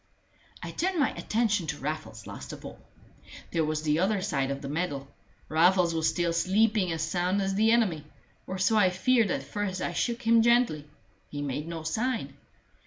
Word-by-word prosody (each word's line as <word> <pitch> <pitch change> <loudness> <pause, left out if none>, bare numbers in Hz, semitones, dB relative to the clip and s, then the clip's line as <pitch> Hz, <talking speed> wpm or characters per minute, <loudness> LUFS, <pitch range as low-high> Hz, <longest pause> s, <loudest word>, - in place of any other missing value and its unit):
I - - -5
turned 370 -1 -1
my 285 - +3
attention 215 -6 0
to 150 0 -3
Raffles 155 +2 -5
last - - -8
of - - -10
all. - - -9 0.7
There 165 - +1
was 155 0 -2
the 150 0 +1
other 195 +3 +2
side 140 -7 -1
of 140 +1 -4
the - - -4
medal. 145 -2 -3 0.4
Raffles 175 +2 +3
was 160 -1 +1
still 175 -1 0
sleeping 195 +2 +2
as 160 -1 -2
sound 180 +4 0
as 195 0 0
the 220 +3 +3
enemy 190 -11 +2 0.4
or 190 - -4
so 200 +4 +2
I 195 -3 +5
feared 225 +4 +2
at - - -1
first 205 -3 -3
I 175 - -2
shook 235 +7 -1
him 230 0 +5
gently: 235 -11 +2 0.4
he 145 0 -5
made 145 +2 -3
no 165 -1 -5
sign. 225 +9 -2
180 Hz, 185 wpm, -28 LUFS, 155-220 Hz, 0.7 s, I